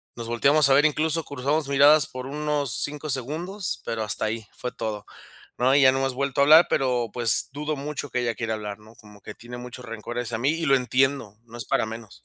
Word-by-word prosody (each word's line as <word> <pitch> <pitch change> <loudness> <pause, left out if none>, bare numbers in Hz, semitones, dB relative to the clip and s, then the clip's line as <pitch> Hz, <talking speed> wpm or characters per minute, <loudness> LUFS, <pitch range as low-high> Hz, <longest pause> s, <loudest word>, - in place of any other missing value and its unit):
Nos 115 -1 -7
volteamos 140 +5 +4
a - - +5
ver, 145 +2 +5
incluso 155 +2 +1
cruzamos 145 +2 -2
miradas 140 0 +5
por 130 0 -8
unos 145 -3 -1
5 150 +1 -4
segundos, 160 - -3
pero 115 -1 -3
hasta 105 0 -1
ahí, 110 0 -3
fue 125 - -5
todo, 105 -2 -5 0.5
¿no?, 130 +2 +3
y 140 - +5
ya 130 - +7
no 135 - -1
hemos 135 -1 -1
vuelto 140 +1 -1
a - - +6
hablar, 155 +4 +7
pero, 125 -4 0
pues, 120 -3 +1
dudo 150 +2 -3
mucho 145 +1 -5
que 125 - -1
ella 120 -1 -1
quiera 115 -2 -2
hablar, 105 -1 -6
¿no?, 110 +1 -18
como 105 -1 -17
que 105 - -10
tiene 120 +1 -10
mucho 125 0 -9
rencor 115 0 -7
hacia 120 -2 -4
mí 130 +5 +1
y 165 +1 -2
lo 135 -1 +5
entiendo, 130 -3 0
no 120 0 -13
es 115 - -3
para - - 0
menos. 110 -2 -10
130 Hz, 230 wpm, -24 LUFS, 115-145 Hz, 0.5 s, ya